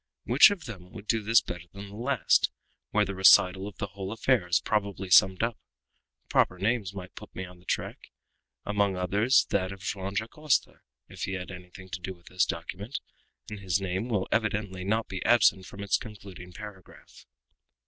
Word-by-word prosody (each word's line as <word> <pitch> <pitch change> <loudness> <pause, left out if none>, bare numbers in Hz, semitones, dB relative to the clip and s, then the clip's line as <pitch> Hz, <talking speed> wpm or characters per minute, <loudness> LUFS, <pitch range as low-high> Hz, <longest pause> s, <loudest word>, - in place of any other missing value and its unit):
Which - - +7
of 200 -6 -5
them 95 -7 -9
would 110 -3 -9
do 115 +1 +1
this 115 +3 +4
better 90 0 -7
than 100 0 -9
the 100 - -11
last, 125 +2 +2 0.4
where 105 0 +2
the 100 - -4
recital 95 0 +5
of 105 - -10
the - - -2
whole 100 0 -7
affair 115 -3 +1
is 85 - +3
probably 100 -3 -2
summed 95 +3 +6
up? 115 -1 -1 0.7
Proper 90 - +2
names 105 0 0
might 90 -2 -8
put - - -12
me 95 - -4
on 90 0 -14
the 90 - -22
track, - - -4 0.6
among 100 -2 +1
others 105 +9 +3
that 95 -1 0
of 95 -1 -9
Joam 95 0 -4
Dacosta; 120 +5 0
and - - -27 0.3
if - - -3
he 95 - -4
had 90 -1 -5
anything 90 +1 -11
to 95 - -5
do 95 +1 -5
with 85 -1 -25
this 90 -1 +1
document, 100 +8 -5 0.5
his 100 -3 -1
name 95 +4 -3
will 100 -5 0
evidently 105 -4 -1
not 110 +4 0
be 95 -1 -5
absent 100 -5 +4
from 100 - -8
its 100 - +2
concluding 100 -5 -10
paragraph." 100 -2 -12
100 Hz, 190 wpm, -28 LUFS, 95-105 Hz, 0.7 s, Which